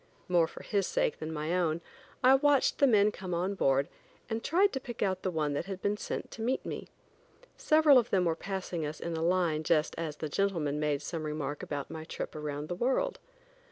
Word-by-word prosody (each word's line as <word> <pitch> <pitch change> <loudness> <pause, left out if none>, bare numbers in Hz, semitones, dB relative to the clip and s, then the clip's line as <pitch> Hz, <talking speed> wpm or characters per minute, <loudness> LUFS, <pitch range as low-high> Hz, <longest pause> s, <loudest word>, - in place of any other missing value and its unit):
More 175 -2 +3
for - - -11
his 200 -3 0
sake - - 0
than 155 0 -4
my 155 +2 -2
own, 170 -3 +1 0.4
I 255 +1 +8
watched 280 0 +3
the 280 - +6
men 210 -3 +5
come 185 -3 -5
on 185 +4 0
board, 135 -6 +2 0.4
and 225 +1 -2
tried 385 +5 +3
to 265 - -1
pick 240 -4 -5
out 190 -2 0
the 185 - -1
one 155 -4 -1
that 145 - -3
had 190 -2 -5
been 205 +2 0
sent - - -5
to 220 - -8
meet 250 +4 -1
me. - - -5 0.7
Several 305 -3 +6
of 240 - -2
them 185 -2 +2
were 165 -1 +1
passing 180 -2 -4
us 150 +1 -4
in 170 -1 -3
a 160 - -2
line 170 -2 +2
just 155 -1 +2
as 155 -3 -4
a 155 - -2
gentleman 155 -4 0
made 150 -1 0
some 165 0 -4
remark 150 -2 -3
about 145 -2 -5
my 160 -1 -6
trip 160 - -6
around 150 -1 -4
the 175 - -3
world. 265 - 0
175 Hz, 220 wpm, -30 LUFS, 155-210 Hz, 0.7 s, I